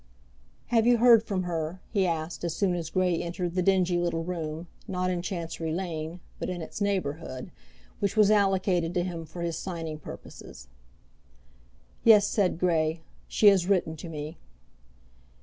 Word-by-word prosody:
"Have 230 -1 +3
you 245 -1 +6
heard 235 -1 +7
from 200 -4 -2
her?" 170 0 -3
he 195 -4 +2
asked 165 0 -3
as 170 -2 -2
soon 195 -3 +1
as 170 -3 -3
Grey 180 -2 +1
entered 175 0 -3
the 185 - +1
dingy 180 -2 +3
little 170 -1 -1
room, 165 -2 -4 0.2
not 185 -1 -1
in 175 -1 -1
Chancery 170 -3 -4
Lane, 165 -1 -4 0.2
but - - -3
in 180 -1 -3
its 180 - -8
neighbourhood, 165 -7 -2 0.5
which 200 +1 -1
was 210 -1 +6
allocated 190 -4 +2
to 175 - +2
him 170 -2 -5
for 170 +2 -6
his 170 -1 -2
signing 165 -4 -5
purposes. 65 - -11 1.3
"Yes," 215 -3 +7
said 200 -5 +1
Grey; 165 -2 +1 0.3
"she - - 0
has 190 -3 +3
written 180 -5 +1
to 170 - -8
me." 155 +1 -6
175 Hz, 160 wpm, -28 LUFS, 165-190 Hz, 1.3 s, heard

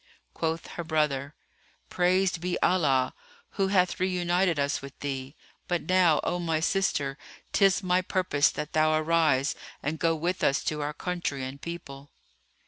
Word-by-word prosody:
Quoth 165 0 -2
her 170 - -6
brother, 150 -3 -1 0.6
"Praised 180 0 +2
be 180 0 -2
Allah, 140 -8 +2 0.4
who 195 -1 0
hath 185 -2 +2
reunited 180 -1 +1
us 140 +1 0
with 140 0 -11
thee! 135 0 -4 0.3
But 175 -1 -1
now, 180 -4 +4
O 175 - -1
my 165 -2 0
sister, 155 -6 0 0.3
'tis 195 -1 +4
my 180 0 +2
purpose 180 -6 +2
that 150 +2 -6
thou 155 0 +3
arise 155 -4 +2 0.3
and 150 +2 -2
go 165 -1 +2
with 170 +3 -2
us 140 - +2
to 150 -1 -2
our 145 +1 -2
country 175 -7 -3
and 135 +2 -7
people." 145 -5 -8
165 Hz, 150 wpm, -27 LUFS, 145-180 Hz, 0.6 s, now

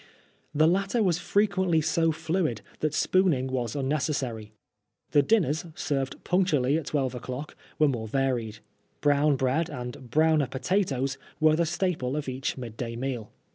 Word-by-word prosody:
The 155 +2 +5
latter 195 +6 +2
was 180 -3 +2
frequently 190 -4 +2
so 160 +1 +2
fluid 160 - -1 0.2
that 155 0 -1
spooning 180 -9 +2
was 125 -3 -2
unnecessary. 135 -6 -2 0.6
The 145 - +5
dinners, 170 - +1
served 135 -3 -2
punctually 155 -8 +2
at 160 -2 -2
twelve 135 -4 0
o'clock, 130 +4 -6 0.2
were 155 - +4
more 115 -5 -2
varied. 120 -4 -1 0.4
Brown 145 0 +3
bread 135 +5 0
and 125 0 -7
browner 155 +1 +3
potatoes 135 -2 -1 0.2
were 155 -1 +5
the 170 +1 +1
staple 170 -7 -1
of 150 - -4
each 130 +1 -3
mid 115 -4 -7
day 115 0 -4
meal. 120 -3 -4
145 Hz, 145 wpm, -27 LUFS, 130-165 Hz, 0.6 s, The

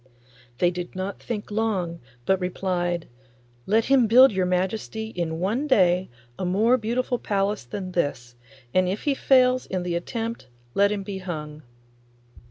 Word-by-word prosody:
They 175 +5 +3
did 180 +1 -6
not 190 +1 -4
think 210 -3 -5
long, 195 -6 -1 0.3
but 190 -1 +2
replied, 175 -2 -1 0.6
'Let 220 +3 +3
him 265 -4 +4
build 255 +4 +8
your 190 -2 0
Majesty 200 +4 -2
in 165 -4 -3
one 225 - 0
day 185 -7 +3 0.3
a - - -2
more 210 +7 +3
beautiful 245 +1 -1
palace 200 - -1
than 185 +9 -5
this, 130 -8 -2 0.4
and 185 -1 +3
if 195 +3 -3
he 290 - +2
fails 255 -1 +3
in 185 -1 -2
the 175 -1 -2
attempt 225 - -4 0.3
let 200 +1 +3
him 205 -1 -2
be 195 -1 -5
hung. 155 -5 -6
190 Hz, 155 wpm, -25 LUFS, 180-225 Hz, 0.6 s, build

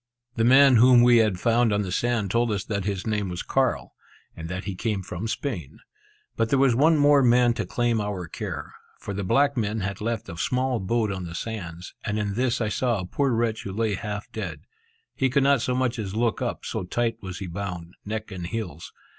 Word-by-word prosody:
The 115 - 0
man 130 +1 +7
whom 120 +1 +7
we 120 -1 +6
had 105 -5 +2
found 115 +1 +3
on 105 0 +1
the 95 - -5
sand 115 -1 0
told 115 +1 +2
us 100 -2 -1
that 100 -4 -3
his 100 -2 -2
name 105 -3 -1
was 90 0 -4
Carl, 105 - 0 0.4
and 80 0 -7
that 90 +2 -4
he 100 - -4
came 100 0 -2
from 90 +4 -5
Spain. 110 - -4 0.6
But 115 0 0
there 135 - +3
was 135 -2 +4
one 155 +6 +4
more 145 -1 +5
man 120 -1 +4
to 120 - -4
claim 120 -3 0
our 100 -4 -4
care; - - -6 0.2
for 100 - -6
the 100 +1 -3
black 140 +9 +2
men 110 -1 -1
had 100 +2 -4
left 115 0 -2
a 85 - -8
small 125 +5 0
boat 110 +2 0
on 95 -2 -4
the 85 0 -7
sands, 90 -6 -6
and 105 -1 -2
in 105 -2 -1
this 125 +2 0
I 110 - +1
saw 120 +1 0
a 90 - -4
poor 140 +9 0
wretch 115 -1 0
who 100 - -6
lay 110 0 0
half 105 +1 -4
dead. - - -5 0.5
He 135 - +1
could 135 +2 +2
not 140 -3 +4
so 125 - 0
much 125 -2 0
as 100 -2 -4
look 115 0 0
up, - - -3
so - - -3
tight 115 +4 -2
was 95 -2 -6
he 95 - -5
bound, 90 -1 -6
neck 110 +1 -5
and 90 -3 -5
heels. 90 -7 -5
110 Hz, 225 wpm, -25 LUFS, 95-120 Hz, 0.6 s, man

